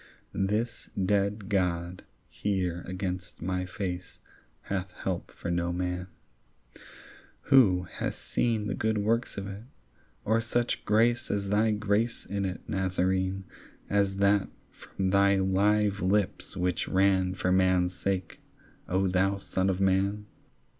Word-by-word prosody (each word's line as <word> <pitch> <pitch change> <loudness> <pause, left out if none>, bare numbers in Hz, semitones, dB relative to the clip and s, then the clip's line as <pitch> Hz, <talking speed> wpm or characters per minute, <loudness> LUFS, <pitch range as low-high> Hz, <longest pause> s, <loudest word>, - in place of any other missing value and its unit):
This 105 +5 -1 0.2
dead 100 +1 0
God 90 -3 -1 0.3
here 90 -4 -2
against 95 0 -4
my 90 +1 -2
face 90 -1 -5 0.4
Hath 95 -1 -4
help - - -4
for 85 - -5
no 85 0 0
man; 90 0 -2 1.4
who 95 -9 +6
hath 90 - -4
seen 115 -3 -1
The 105 - -2
good 110 0 0
works 110 +3 0
of 100 - -3
it, 100 +1 -7 0.6
or 110 +2 +2
such 120 +1 -1
grace 115 +3 +2
As 100 -1 -1
thy 105 +2 +3
grace 105 +2 0
in 100 0 -2
it, 95 -1 -4
Nazarene, 95 -1 0 0.5
As 100 -1 +2
that 100 0 +3 0.2
from 95 -1 -3
thy 100 0 +5
live 100 +1 +2
lips 95 +1 0
which 90 -1 0
ran 95 -1 +2
For 90 0 0
man's 95 -1 +3
sake, 90 0 -3 0.5
O 95 +1 +2
thou 95 +2 +2
son 95 -1 -1
of 95 -1 0
man? 100 +2 +1
95 Hz, 130 wpm, -28 LUFS, 90-105 Hz, 1.4 s, who